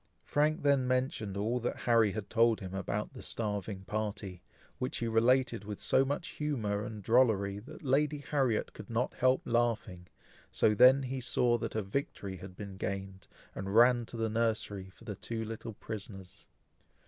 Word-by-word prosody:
Frank 150 +1 +1
then 140 -3 +3
mentioned 125 -6 -1
all 115 +5 0
that 120 - -3
Harry 115 -4 +4
had 110 -2 -4
told 115 -1 +3
him 95 -2 -7
about 100 +4 -3
the 130 - -9
starving 105 -3 -3
party, 100 -3 -4 0.4
which 125 - -2
he 115 - -2
related 120 0 +3
with 105 0 -6
so 135 - +3
much 145 +5 -3
humour 110 -9 -2
and 105 -1 -7
drollery, 105 -4 +3
that 155 +9 -12
Lady 150 +2 +2
Harriet 135 -5 0
could - - -10
not 120 +2 0
help 130 +1 +2
laughing; 115 -7 0 0.4
so 105 - +3
then 130 +5 +7
he 130 0 -3
saw 120 -1 +2
that 115 -1 -4
a 110 - 0
victory 100 -3 -4
had 90 0 -10
been 100 -1 -8
gained, 95 0 -5 0.3
and 95 +1 -4
ran 120 +1 +6
to 120 - -7
the 115 0 0
nursery 110 -4 -1
for 95 - -18
the 105 -3 -5
two 110 +3 -4
little 115 0 -6
prisoners. 100 -4 -8
115 Hz, 170 wpm, -32 LUFS, 100-125 Hz, 0.4 s, then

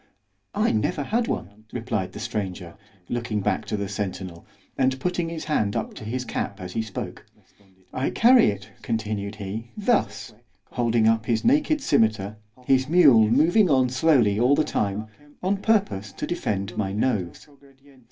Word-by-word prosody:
_——I 210 +3 +2
never 110 +6 0
had 230 - 0
one, 105 +2 -5
replied 115 -6 -3
the - - -8
stranger, 100 -6 -4 0.3
looking 115 -3 -2
back 100 - -1
to 105 - -3
the 100 -1 -3
centinel, 95 -4 -5 0.3
and 130 0 +1
putting 175 +1 -1
his 165 -1 -6
hand 110 -10 0
up - - -3
to - - -10
his 125 +4 -3
cap 100 -4 -4
as 90 -1 -7
he 115 - 0
spoke——I 100 +1 -7
carry 245 +1 +5
it, 100 0 -3
continued 105 -2 -3
he, 105 +3 -6
thus——holding 120 - -1
up 110 0 +2
his 115 -2 0
naked 295 +4 +3
scymetar, 110 - +1 0.3
his 130 +1 +2
mule 140 -11 +6
moving 165 - +4
on 130 -3 +3
slowly 130 -7 +3
all 125 +4 +4
the 155 - +2
time—on 130 - -3
purpose 190 - 0
to - - -4
defend 100 - -3
my 95 -2 -1
nose. 105 - -2
115 Hz, 150 wpm, -24 LUFS, 100-145 Hz, 0.3 s, mule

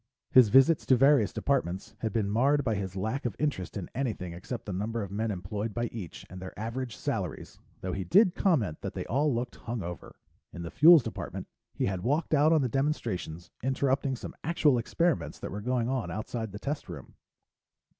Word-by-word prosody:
His 125 -4 +7
visits 135 +7 +5
to 130 - +6
various 135 +3 +4
departments 110 -6 -1
had 110 -1 -2
been 110 -4 0
marred 135 +8 +2
by 115 -4 0
his 95 -2 -3
lack 110 +8 -2
of 120 -5 -2
interest 140 -12 -2
in 95 - -5
anything 110 -9 -3
except 110 +7 -6
the 100 - -4
number 110 +4 -2
of 100 - -7
men 110 +3 -1
employed 100 +3 -4
by 120 0 0
each 95 -8 -8
and 90 +1 -10
their 95 - -8
average 115 +2 -4
salaries, - - -4 0.2
though 90 -1 -3
he 95 - -2
did 185 - +5
comment 130 - +1
that - - -5
they - - -3
all 145 +4 +1
looked 120 0 -3
hung 115 -2 -4
over. 90 0 -7 0.4
In 85 - -7
the 85 - -6
Fuels 160 -1 +8
Department, - - -5 0.3
he - - 0
had 95 -2 -2
walked 145 - 0
out 155 +1 +5
on 155 -4 +4
the - - +1
demonstrations, 110 - -2
interrupting 135 +1 0
some - - -8
actual 150 -5 +3
experiments 165 +8 0
that - - -6
were 105 - -5
going 120 +1 0
on 125 -8 -1
outside 110 +2 -4
the 100 - -7
test 145 +7 -4
room. - - -9
115 Hz, 200 wpm, -29 LUFS, 100-140 Hz, 0.4 s, Fuels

